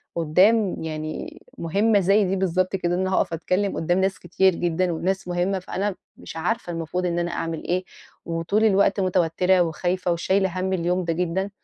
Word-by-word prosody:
قدّام 185 +6 +3
يعني 155 -1 -5 0.2
مهمّة 200 +5 +2
زي 195 +3 +3
دي 190 +1 0
بالضبط 185 0 0
كده 175 -2 -1
إن 180 - -1
أنا 190 0 -1
هاقف - - 0
أتكلّم 185 +4 -1
قدّام 175 +3 +1
ناس 190 0 0
كتير 185 +1 +2
جدًا 175 +1 0
وناس 185 +3 -2
مهمّة، 180 +2 0
فأنا 190 +2 -3 0.2
مش - - -10
عارفة 175 +1 -2
المفروض 165 +2 -3
إن 175 -1 0
أنا 175 0 -2
أعمل 165 -1 -4
إيه، 180 +1 -1 0.4
وطول 170 +6 0
الوقت 200 -1 +3
متوتّرة 180 0 +2
وخايفة 175 +2 -1
وشايلة 185 +2 0
هَم 190 +1 -1
اليوم 180 +1 0
ده 165 -1 -1
جدًا، 180 +3 -1
180 Hz, 175 wpm, -23 LUFS, 170-190 Hz, 0.4 s, قدّام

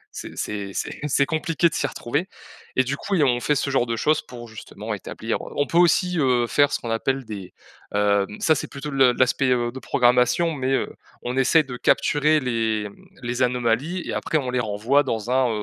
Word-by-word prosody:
C'est - - -8
c'est 100 -2 -4
c'est - - -4
c'est 140 -1 +2
compliqué 160 +2 +1
de - - -12
s'y 140 - 0
retrouver 145 +7 -3 0.5
et 130 - +4
du 135 +2 -3
coup 200 - -2
et 165 - +3
on 125 -3 +2
fait 150 +4 +1
ce 140 - -1
genre 125 -2 +1
de 115 - -1
choses 150 +6 +1
pour 120 -1 -11
justement 110 -1 -7
établir, - - -4
heu, - - -9
on 145 - +1
peut 170 - +1
aussi, 175 0 +3
heu, 125 -4 +2
faire 145 +4 +3
ce - - -1
qu'on 115 - -5
appelle 130 +4 -1
des, 100 -4 -8 0.4
hem, 100 -1 +2
ça 160 - +4
c'est 150 - -3
plutôt 145 +2 -7
le 135 -2 +4
l'aspect, 130 +1 +2
heu, 120 -1 +1
de 130 - -8
programmation, 125 +8 +2
mais, 130 -2 -2
heu, - - -1 0.3
on 125 +1 -3
essaie 135 +5 +4
de 125 -3 -7
capturer 155 +3 +2
les, 115 -5 -1
hem, 100 - -9 0.3
les 125 +1 -3
anomalies 125 +8 0
et - - -3
après 155 - -1
on 130 -4 -2
les 125 - 0
renvoie 115 +5 +2
dans 115 -4 -3
un, 130 -1 +3
130 Hz, 220 wpm, -23 LUFS, 120-145 Hz, 0.5 s, et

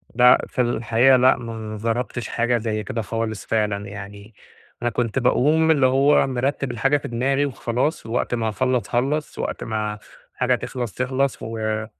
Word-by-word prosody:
لأ، 125 +1 +6
في 130 - -1
الحقيقة 120 +2 +3
لأ، 130 +2 +5
ما 115 -2 -7 0.2
جربتش 115 +2 -2
حاجة 120 +1 +1
زي 110 -1 -2
كده 115 - -3
خالص 110 -1 -4
فعلًا 105 -2 -1
يعني، 100 +2 -10 0.5
أنا 120 - +1
كنت 120 +2 -1
باقوم 155 +6 +3
اللي 140 -4 +3
هو 135 +3 +4
مرتِّب 135 +1 -1
الحاجة 135 +5 +2
في - - -7
دماغي 135 +4 0
وخلاص 130 +2 -2
ووقت 120 +1 -1
ما 110 -1 -1
اخلّص، 130 +2 0
خلّص، 140 +5 -1
وقت - - -3
ما 105 -1 -3 0.4
حاجة - - +2
تخلَص، 120 -5 -5
تخلَص 130 +1 -1
و 110 -1 -3
120 Hz, 160 wpm, -22 LUFS, 110-130 Hz, 0.5 s, لأ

